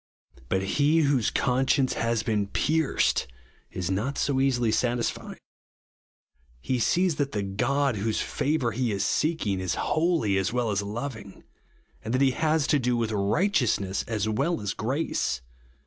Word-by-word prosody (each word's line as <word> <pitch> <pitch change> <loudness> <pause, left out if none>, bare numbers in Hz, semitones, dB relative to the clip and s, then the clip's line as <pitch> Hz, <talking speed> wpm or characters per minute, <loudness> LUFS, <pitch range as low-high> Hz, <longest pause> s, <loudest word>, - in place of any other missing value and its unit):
But 95 0 0
he 145 +10 +2
whose 140 -6 +2
conscience 130 +1 +1
has 115 -1 0
been 105 -2 0
pierced, 155 +8 +1 0.4
is 95 0 -3
not 110 +9 -1
so 135 -2 +1
easily 125 -4 +2
satisfied. 120 0 -1 1.2
He 125 - -1
sees 175 +6 +2
that 140 -2 -1
the 105 -2 -1
God, 130 +6 0
whose 110 +2 -1
favour 140 -5 -1
he 120 0 -1
is 100 - -1
seeking, 150 - 0
is 95 -1 -2
holy 155 - +1
as 95 +2 -1
well 120 -2 0
as 100 0 0
loving; 110 -1 -6 0.6
and 115 +3 -2
iliat - - +2
be 135 -1 +4
lias 155 +1 +1
to 150 - +2
do 125 -1 0
witb 105 -3 0
righteousness 115 - +1
as 110 -2 -1
well 120 +10 0
as 105 0 -3
grace. 120 - -2
120 Hz, 150 wpm, -26 LUFS, 105-140 Hz, 1.2 s, be